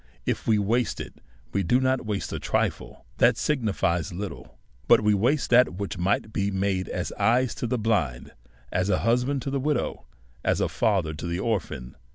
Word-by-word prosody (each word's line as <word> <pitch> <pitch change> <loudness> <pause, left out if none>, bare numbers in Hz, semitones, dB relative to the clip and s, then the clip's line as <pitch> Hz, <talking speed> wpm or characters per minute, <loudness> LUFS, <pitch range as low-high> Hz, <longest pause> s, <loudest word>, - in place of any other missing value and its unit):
If - - -2
we 110 -2 +4
waste 115 +4 0
it, - - -8 0.3
we 100 - +1
do 120 +8 +3
not 130 -2 0
waste 105 -2 -3
a - - -3
trifle - - -2
that 120 0 +5
siguilies 105 - 0
little, 95 +1 -7 0.3
but - - +6
we 105 0 +3
waste 125 +9 +1
that 125 -6 +5
which 100 +2 -4
might 100 +4 0
be 100 -1 0
made 95 -1 -1
as - - -3
eyes 125 +1 +3
to 120 - -3
the 125 - 0
blind, 90 - -1 0.4
as 90 +2 0
a - - +2
hus 120 +2 +3
band 140 -1 -1
to 135 - -3
the 140 - 0
widow, 145 -1 -2 0.4
as - - +1
a - - +2
father 95 -9 +1
to 75 +3 -6
the 85 +1 -2
orphan. 90 - -3
105 Hz, 195 wpm, -26 LUFS, 95-125 Hz, 0.4 s, but